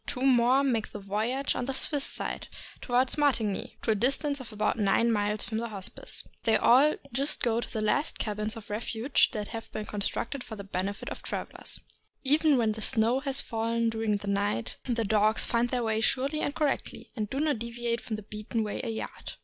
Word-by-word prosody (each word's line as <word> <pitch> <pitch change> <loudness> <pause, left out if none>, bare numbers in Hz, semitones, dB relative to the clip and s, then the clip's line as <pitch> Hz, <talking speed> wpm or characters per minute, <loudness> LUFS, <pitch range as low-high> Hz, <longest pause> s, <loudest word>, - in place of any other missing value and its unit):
Two 250 - -2
more 255 +1 +5
make 235 -5 0
the 210 - -5
voyage 220 +8 -1
on 245 - -2
the 270 - -2
Swiss 285 +1 +2
side, - - -3 0.3
toward 250 +1 +2
Martigny, 230 -9 0
to 225 - +2
a - - +5
distance 275 +6 +2
of 250 -3 -9
about 215 +2 0
nine 215 +3 +3
miles 210 -1 0
from 220 -1 -2
the 235 0 -3
Hospice. 195 -3 -3 0.2
They 225 - +3
all 275 +6 +6
go - - -8 0.2
just 280 +4 -1
to 235 -1 +2
the 220 -2 -2
last 285 +8 +1
cabins 215 +1 -3
of 215 -2 -10
refuge 225 +4 +1
that 210 -2 -3
have 225 -1 -7
been 215 - -4
constructed 210 +6 -3
for 220 - -8
the 200 - -7
benefit 195 +1 -3
of - - -7
travelers. - - -4 0.4
Even 295 +1 +4
when 225 -3 +2
the 220 +1 -5
snow 225 +4 +3
has 275 -1 +4
fallen 230 0 0
during 220 -2 0
the 200 - -8
night, 200 - 0
the 230 -2 +1
dogs 215 +1 +3
find 235 +1 +1
their 245 -1 0
way 220 -1 0
surely 275 +6 +1
and 285 - -1
correctly, 300 -3 -2
and 215 -3 -2
do 270 - -2
not 295 -5 +1
deviate 235 0 -2
from 220 - -4
the 215 - -7
beaten 215 +2 -3
way 210 - -3
a 240 - -2
yard. 220 - -5
230 Hz, 205 wpm, -29 LUFS, 215-260 Hz, 0.4 s, all